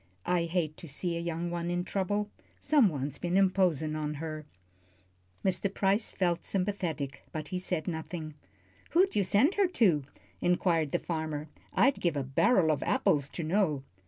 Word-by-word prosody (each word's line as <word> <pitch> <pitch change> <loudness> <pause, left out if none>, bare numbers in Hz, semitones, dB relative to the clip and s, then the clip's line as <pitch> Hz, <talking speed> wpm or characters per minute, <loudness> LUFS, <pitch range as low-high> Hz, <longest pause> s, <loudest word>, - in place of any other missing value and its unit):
"I 175 -2 +1
hate 165 -3 -1
to 170 - -10
see 170 +4 -3
a - - -2
young 170 0 -3
one 170 0 -2
in 175 0 0
trouble. 205 +2 -1 0.3
Someone's 155 - +2
been 175 +1 0
imposin' 180 -6 +2
on 150 -1 -2
her." 155 0 -6 1.0
Mr. 190 +1 +1
Price 200 +3 +1
felt 175 -2 0
sympathetic, 180 -8 -2
but 155 -1 -5
he 185 - -2
said 180 -4 -2
nothing. 160 -1 -4 0.6
"Who'd 375 +3 +4
you 205 - +3
send 210 - +3
her 400 -2 +3
to?" 190 - +3 0.4
inquired 175 -4 +2
the - - +2
farmer. 155 -3 -4 0.2
"I'd 275 +2 +3
give 170 -4 +1
a 140 - 0
barrel 160 - +3
of 150 - -1
apples 140 -1 +1
to 170 - -5
know." 155 -5 +1
175 Hz, 160 wpm, -30 LUFS, 155-195 Hz, 1.0 s, Who'd